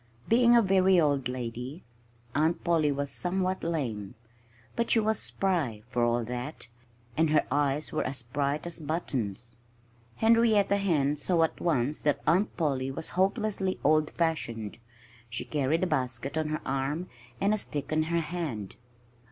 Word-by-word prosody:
Being 240 +1 +5
a 235 - +6
very 190 -1 +4
old 145 -5 +2
lady, 125 +5 -5 0.5
Aunt 155 +4 +1
Polly 160 -4 +2
was 140 0 -2
somewhat 185 +1 -1
lame. 120 -12 -3 0.6
But 235 0 0
she 230 - +5
was 220 0 +1
spry, 155 - 0
for 120 -1 +1
all 120 0 +2
that. 125 +3 -5 0.5
And 160 +1 +3
her 155 - +3
eyes 145 +1 0
were 155 - 0
as 130 -1 -3
bright 140 +5 -2
as 170 -1 -5
buttons. 125 - -3 0.6
Henrietta 220 - +4
Hen 150 -7 +1
saw 165 +3 +2
at 160 - -2
once 150 -3 +1
that 145 -1 0
Aunt 185 +7 +2
Polly 135 -5 0
was 135 +4 -3
hopelessly 195 0 0
old 155 +1 +3
fashioned. 120 -11 -2 0.5
She 115 - -4
carried 150 +3 0
a - - +4
basket 130 -4 -1
on 160 -1 0
her 155 - -2
arm, 140 +6 -2 0.3
and 200 +2 +2
a 215 - +1
stick 145 -5 -4
in 155 0 +2
her 170 0 +1
hand. 150 - -4
155 Hz, 155 wpm, -29 LUFS, 130-180 Hz, 0.6 s, a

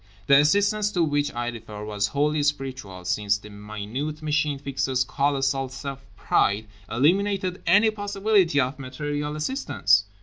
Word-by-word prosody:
The 140 0 +7
assistance 205 +6 +2
to 175 - +2
which 145 -2 0
I 120 0 -1
refer 110 -3 -8
was 105 -1 -1
wholly 150 +6 +1
spiritual; 130 -10 -3
since 105 +2 +1
the 105 0 -13
minute 110 +9 -5
Machine 150 -1 +1
Fixer's 135 -2 -1
colossal 135 0 0
self 135 +1 -7
pride 105 +2 +1 0.2
eliminated 185 - +1
any 215 +2 +5
possibility 200 -5 +1
of 135 +1 0
material 145 +3 -4
assistance. 155 - +1
140 Hz, 135 wpm, -25 LUFS, 120-155 Hz, 0.2 s, The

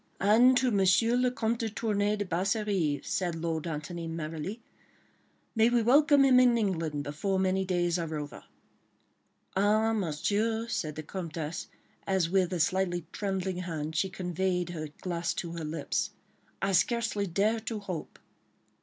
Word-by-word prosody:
"And 235 +6 +5
to 255 0 +3
M. 200 -4 +2 0.4
le 250 - +3
Comte 235 -2 -1
de 225 - -1
Tournay 210 -1 0
de 205 -1 -3
Basserive," 185 -4 0
said 175 -3 -1
Lord 165 0 -2
Antony, 165 +2 -5
merrily. 165 +5 -5 1.0
"May 225 +1 +5
we 240 -1 +2
welcome 285 +3 +5
him 255 -2 +6
in 245 -2 +5
England 165 -9 -1
before 155 +7 -2
many 190 0 +1
days 175 -1 +1
are 160 -2 -3
over." 145 -1 -6 1.1
"Ah, 215 +3 +3
Monsieur," 215 +5 0
said 155 -9 -3
the 155 - -5
Comtesse, 165 -1 -5 0.4
as 185 -3 +1
with 185 -2 +2
a 180 - -2
slightly 175 0 +1
trembling 190 -2 -2
hand 160 -3 -4
she 190 +4 +1
conveyed 180 -1 -1
her 155 -3 -5 0.2
glass 175 -1 -2
to 170 - -4
her 170 -1 -5
lips, 155 -1 -2 0.5
"I 195 - +2
scarcely 215 0 +1
dare 205 +6 +1
to 220 0 -4
hope." 185 -6 -6
190 Hz, 150 wpm, -29 LUFS, 165-215 Hz, 1.1 s, him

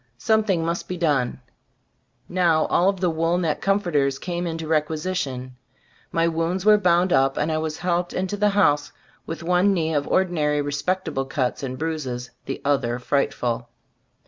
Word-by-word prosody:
Something 200 - +1
must 170 +1 -2
be 180 - -4
done. 140 -7 0 0.9
Now 170 -3 +2
all 180 +3 +4
of 195 -2 -3
the 180 - +2
wool 165 +2 +1
neck 165 -4 -1
comforters 170 -9 +1
came 175 +1 -3
into 165 -1 -4
requisition; 150 -5 -2 0.5
my 165 0 +2
wounds 170 +3 -1
were 210 -1 +6
bound 180 -1 +3
up, 135 0 +3
and 155 +2 0
I 155 - 0
was 155 -1 -3
helped 175 0 -1
into 185 +2 -2
the 210 0 +2
house, 145 -8 +2 0.4
with 165 0 -5
one 180 +3 +3
knee 160 -2 0
of 145 -1 0
ordinary 155 -6 +1
respectable 145 0 -1
cuts 130 -2 -2
and 130 -2 -4
bruises; 135 -6 -4
the - - -5
other 135 -4 +1
frightful. 120 -3 -1
160 Hz, 160 wpm, -23 LUFS, 145-180 Hz, 0.9 s, were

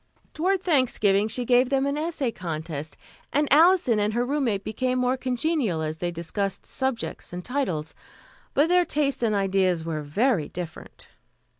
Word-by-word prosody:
Toward 370 +4 0
Thanksgiving 220 - +2
she 240 +3 -2
gave 245 +1 +4
them 270 0 +1
an 280 0 0
essay 300 -5 -1
contest, 160 -4 -5 0.3
and 295 +1 +2
Alison 320 - +5
and 210 +1 0
her 240 +1 +1
roommate 250 -8 0
became 255 +4 -1
more 250 +1 +2
congenial 255 - 0
as 155 0 -4
they 175 - -1
discussed 175 +4 -3
subjects 265 -3 -3
and 180 0 -6
titles. 185 - -2 0.6
But 295 +4 +4
their 360 0 +5
tastes 290 -5 -1
and 220 -3 +1
ideas 190 -4 +1
were 160 -2 -3
very 175 - +1
different. 175 -2 -8
235 Hz, 155 wpm, -25 LUFS, 180-280 Hz, 0.6 s, Alison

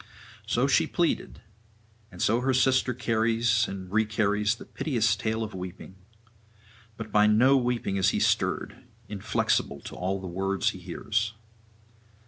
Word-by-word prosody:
So - - +1
she - - +3
pleaded, - - -1 0.7
and 90 - -4
so 115 +3 +3
her 130 0 +1
sister 130 0 +3
carries 115 -1 +1
and 95 -1 -7
recarries 105 0 +1
the - - -11
piteous 115 -8 0
tale 110 +1 -2
of 110 - -6
weeping. 95 0 -8 1.0
But 110 -2 -7
by 105 0 +5
no 120 +6 +5
weeping 120 -6 0
is 95 0 +3
he - - -1
stirred, - - 0 0.2
inflexible 95 -7 -1
to - - -9
all 95 +2 -2
the 95 - -8
words 95 +2 -1
he 95 - -10
hears. 105 +5 -2
105 Hz, 140 wpm, -27 LUFS, 95-115 Hz, 1.0 s, by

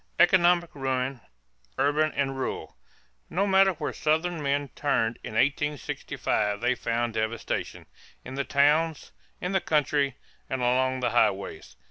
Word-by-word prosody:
=Economic 175 -2 +4
Ruin 130 -2 -2 0.6
Urban 145 +3 +2
and 135 -1 -1
Rural.= 135 - -4 0.5
No 195 +4 +1
matter 195 -1 +4
where 160 - -4
Southern 160 +2 0
men 140 0 0
turned 115 -5 0
in 110 - -7
1865 135 -6 -1
they 125 - +2
found 120 -1 -2
devastation 110 +1 -3 0.4
in 130 - -7
the 140 +1 -1
towns, 150 +2 +2 0.3
in 180 - -3
the 190 -1 +1
country, 145 -3 +1 0.3
and 130 -1 -2
along 130 +1 +1
the 120 - +1
highways. 100 -4 0
140 Hz, 130 wpm, -27 LUFS, 125-155 Hz, 0.6 s, =Economic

